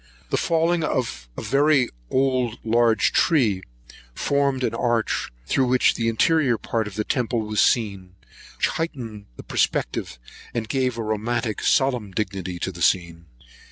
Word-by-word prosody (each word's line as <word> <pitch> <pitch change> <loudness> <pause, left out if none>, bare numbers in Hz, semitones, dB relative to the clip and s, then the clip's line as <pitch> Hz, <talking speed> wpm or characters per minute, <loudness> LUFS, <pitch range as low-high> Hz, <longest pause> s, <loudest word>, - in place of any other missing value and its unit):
The - - +2
falling 165 0 +1
of 65 - -2
a - - -5
very 135 +3 +3 0.2
large 130 -3 +1
old 115 -1 +4 0.2
tree, 115 - +3 0.5
formed 140 -2 0
an - - 0
arch, 120 -2 0 0.2
through 130 - +1
which 125 0 +4
the 115 -1 0
interior 130 +1 +2
part 110 +1 -2
of 100 - -9
the 105 - -1
temple 120 -1 -1
was 105 -1 0
seen, 100 -6 0 0.4
which - - +2
heightened 120 -10 -5
the - - -10
perspective, - - -1 0.4
and 115 -2 -2
gave 130 -1 0
a 115 - -2
romantic 110 +1 -2
solemn 125 -7 +2
dignity 95 -3 -3
to 95 - -1
the 85 -1 -11
scene. 85 -2 +1
115 Hz, 150 wpm, -23 LUFS, 105-130 Hz, 0.5 s, old